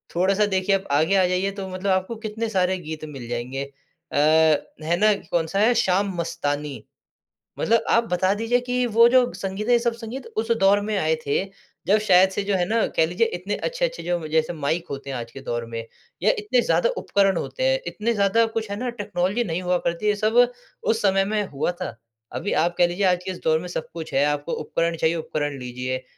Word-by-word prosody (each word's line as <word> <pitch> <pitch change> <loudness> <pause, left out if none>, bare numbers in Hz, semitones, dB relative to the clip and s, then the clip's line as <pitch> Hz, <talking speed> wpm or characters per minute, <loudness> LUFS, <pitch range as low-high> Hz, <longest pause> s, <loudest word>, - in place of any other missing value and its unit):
थोड़ा-सा, 195 +4 +3
देखिए, 195 0 +1
अब 195 0 -4
आगे 160 +7 +3
आ 190 - +4
जाइए, 185 +2 0
तो 195 -1 -6
मतलब 185 +2 -3
आपको 190 +5 0
कितने 220 +1 -3
सारे 185 -2 +1
गीत 155 -2 -7
मिल 135 -5 -8
जाएँगे 125 +3 -3
अ, 150 +4 -16 0.7
है 170 +2 +1
ना, 215 +3 +4 0.2
कौन-सा 165 +3 0
है, 225 +4 +5
शाम 195 -3 +1
मस्तानी। 150 -4 -3 0.8
मतलब 230 0 +2
आप 230 - +4
बता 185 +2 +2
दीजिए 230 +3 +1
कि 250 0 0
वो 230 +1 +8
जो 250 0 +4
संगीत 195 +3 -4
है, 245 - +4
ये 240 - +5
सब 235 0 0
संगीत 235 +3 -7
उस 225 +1 0
दौर 200 +1 +5
में 210 0 -2
आए 160 -3 +2
थे, 140 +6 +1 0.4
जब 205 +3 +5
शायद 185 0 +6
से, 200 +1 -2
जो 200 0 0
है 180 -1 +1
ना, 225 0 +2
कह 160 - +2
लीजिए 180 +8 +1
इतने 195 +4 -3
अच्छे-अच्छे - - -2
जो 175 0 0
म 155 - -6
जैसे 160 +2 +1
माइक 160 +2 -2
होते 140 0 -6
हैं 135 - -3
आज 115 -1 -7
के 135 - -10
दौर 120 -2 -3
में, 115 0 -6 0.4
या - - +5
इतने 415 - +2
ज़्यादा 485 - +2
उपकरण 195 - +2
होते - - -4
हैं, - - +3
इतने 230 +2 -1
ज़्यादा 215 +2 +3
कुछ 220 -2 -2
है - - -2
ना, 250 0 -2
टेक्नोलॉज़ि 205 -1 -1
नहीं 175 -4 -3
हुआ 180 0 +1
करती, 170 +5 -1
ये 210 - +3
सब 215 +3 0 0.5
उस 225 0 +1
समय 195 -1 +3
में 210 +1 0
हुआ 140 +4 -1
था। 120 - -4 0.4
अभी 205 - -3
आप 175 0 -1
कह 175 - +5
लीजिए, 180 +3 -1
आज 180 -1 +2
के 190 - -3
इस 180 - -8
दौर 160 0 +3
में 180 - -7
सब 175 -3 -5
कुछ 165 -2 -7
है, 140 +1 +3
आपको 145 +2 -1
उपकरण 170 0 -1
चाहिए, 160 +1 +1
उपकरण 145 -3 -3
लीजिए। 125 +1 -4
190 Hz, 220 wpm, -23 LUFS, 160-215 Hz, 0.8 s, वो